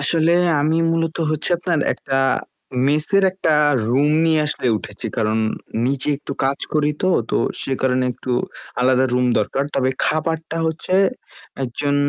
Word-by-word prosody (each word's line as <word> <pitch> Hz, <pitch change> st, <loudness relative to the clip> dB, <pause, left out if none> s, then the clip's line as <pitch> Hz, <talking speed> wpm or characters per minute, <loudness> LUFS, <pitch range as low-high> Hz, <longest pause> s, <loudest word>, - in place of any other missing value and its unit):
আসলে 160 Hz, +3 st, +2 dB, 0.3 s
আমি 155 Hz, +2 st, +1 dB
মূলত 165 Hz, -1 st, -1 dB
হচ্ছে 155 Hz, -1 st, -1 dB
আপনার 175 Hz, -2 st, 0 dB
একটা 135 Hz, -1 st, -3 dB, 0.7 s
মেসের 155 Hz, +7 st, +3 dB
একটা 185 Hz, -4 st, 0 dB, 0.4 s
রুম 135 Hz, +4 st, +3 dB, 0.2 s
নিয়ে 160 Hz, -1 st, +3 dB
আসলে 150 Hz, -, -2 dB
উঠেছি। 105 Hz, -1 st, -7 dB
কারণ 110 Hz, -1 st, +1 dB, 0.5 s
নিচে 135 Hz, +2 st, -1 dB
একটু 140 Hz, -, -7 dB
কাজ 135 Hz, +1 st, 0 dB, 0.2 s
করিতো, 150 Hz, +3 st, 0 dB, 0.2 s
তো -, -, +1 dB, 0.2 s
সে 135 Hz, -, -3 dB
কারণে 130 Hz, -1 st, +2 dB
একটু 125 Hz, -, -7 dB, 0.5 s
আলাদা 130 Hz, +1 st, +3 dB
রুম 125 Hz, 0 st, +2 dB
দরকার। 120 Hz, +6 st, -1 dB
তবে 130 Hz, -1 st, +1 dB
খাবারটা 160 Hz, +1 st, -1 dB
হচ্ছে 160 Hz, +3 st, -2 dB, 0.7 s
একজন 145 Hz, +4 st, -2 dB
145 Hz, 140 wpm, -20 LUFS, 130-160 Hz, 0.7 s, মেসের